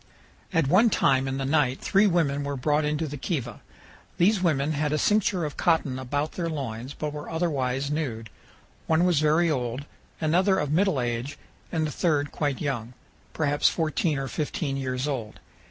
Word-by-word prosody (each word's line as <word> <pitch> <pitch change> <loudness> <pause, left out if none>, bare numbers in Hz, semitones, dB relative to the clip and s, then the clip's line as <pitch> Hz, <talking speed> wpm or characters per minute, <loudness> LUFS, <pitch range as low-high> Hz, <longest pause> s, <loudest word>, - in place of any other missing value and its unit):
At 165 -5 +2
one 200 - +5
time 135 -8 +2
in 135 0 -2
the 135 - -2
night 135 -2 +2
three 200 +1 +3
women 150 -6 +1
were 140 0 -3
brought 150 +3 +1
into 150 +2 -1
the 145 +1 -6
kiva. 130 - -4 0.6
These 190 +3 +3
women 155 -4 +1
had 150 0 -1
a 155 - +1
cincture 195 -1 +2
of 150 - -6
cotton 155 -6 +1
about 145 +4 -2
their 170 -2 -3
loins, 130 -3 -5
but 150 -1 -4
were 150 0 -7
otherwise 140 -5 -1
nude. 115 -8 -3 0.6
One 160 +2 +3
was 175 -5 +3
very 155 +2 +3
old, 125 0 -2 0.3
another 180 +5 +3
of 150 -5 -1
middle 185 -2 +2
age, 120 +3 -3 0.3
and 160 -2 0
the 150 - -3
third 150 -3 0
quite 145 -4 -1
young, 125 -5 -3 0.4
perhaps 145 -2 +2
fourteen 160 -1 0
or 135 0 -3
fifteen 145 0 -2
years 130 0 -2
old. 120 -7 -4
150 Hz, 175 wpm, -26 LUFS, 135-160 Hz, 0.6 s, one